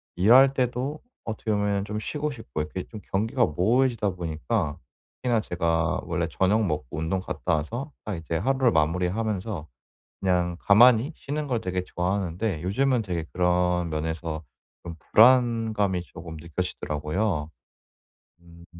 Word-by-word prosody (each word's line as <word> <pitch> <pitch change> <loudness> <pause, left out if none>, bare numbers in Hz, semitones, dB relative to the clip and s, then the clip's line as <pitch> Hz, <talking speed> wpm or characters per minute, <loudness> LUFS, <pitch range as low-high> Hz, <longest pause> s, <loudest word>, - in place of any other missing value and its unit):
일할 125 +9 +6
때도 130 +4 -1 0.2
어떻게 110 0 -3
보면 100 -1 +1
좀 105 +1 -4
쉬고 150 +5 -3
싶고 95 - -5
이렇게 85 +5 -4
좀 110 -3 -9
경계가 115 +5 +2
모호해지다 110 - +2
보니까 80 0 -2 0.4
특히나 120 -3 +2
제가 85 -1 0
원래 85 -2 -1
저녁 105 +5 +2
먹고 75 -6 -2
운동 80 +4 -1
갔다 90 -2 -1
와서 120 - -4
딱 105 -3 -3
이제 80 0 -3
하루를 130 +4 +2
마무리하면서 90 +3 -1 0.5
그냥 90 -2 +1
가만히 120 +7 +6
쉬는 145 +1 -4
걸 120 -4 -1
되게 90 0 -2
좋아하는데 90 0 -2
요즘은 125 +7 +1
되게 85 -5 -3
그런 90 -1 +1
면에서 80 0 -3 0.4
좀 85 -1 -7
불안감이 110 - +4
조금 80 -2 -10
느껴지더라고요. 80 0 -2 0.9
음. 85 0 -16
95 Hz, 315 characters per minute, -26 LUFS, 85-115 Hz, 0.9 s, 일할